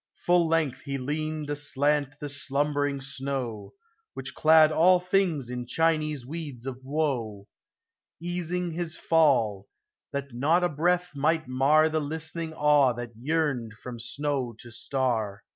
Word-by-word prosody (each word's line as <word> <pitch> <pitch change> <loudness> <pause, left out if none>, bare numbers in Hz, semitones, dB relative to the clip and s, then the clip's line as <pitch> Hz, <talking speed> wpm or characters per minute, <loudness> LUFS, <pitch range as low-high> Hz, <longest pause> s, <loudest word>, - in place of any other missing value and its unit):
Full 175 -1 +4
length 155 -5 0
he 140 +1 -4
leaned 150 +2 -3
aslant 145 0 0
the 145 - -5
slumbering 145 0 -1
snow, 135 - -4 0.4
Which 135 +1 -6
clad 155 0 +6
all 175 +4 +5
things 180 -7 0
in 125 0 -5
Chinese 155 -2 0
weeds 145 -4 -7
of 130 -2 -5
woe, 130 -8 -2 0.7
Easing 175 0 -3
his 165 0 -4
fall 120 -12 +2 0.2
— - - -65
that 140 -2 -5
not 155 +9 +2
a 175 - +2
breath 175 +4 +1
might 155 +1 +1
mar 140 +5 +4
The 155 0 0
listening 160 +2 -4
awe 150 -4 +4
that 120 0 -6
yearned 135 -3 -1
from 120 +2 -9
snow 135 -1 -2
to 120 0 -11
star. 115 -5 -2
145 Hz, 140 wpm, -27 LUFS, 130-160 Hz, 0.7 s, clad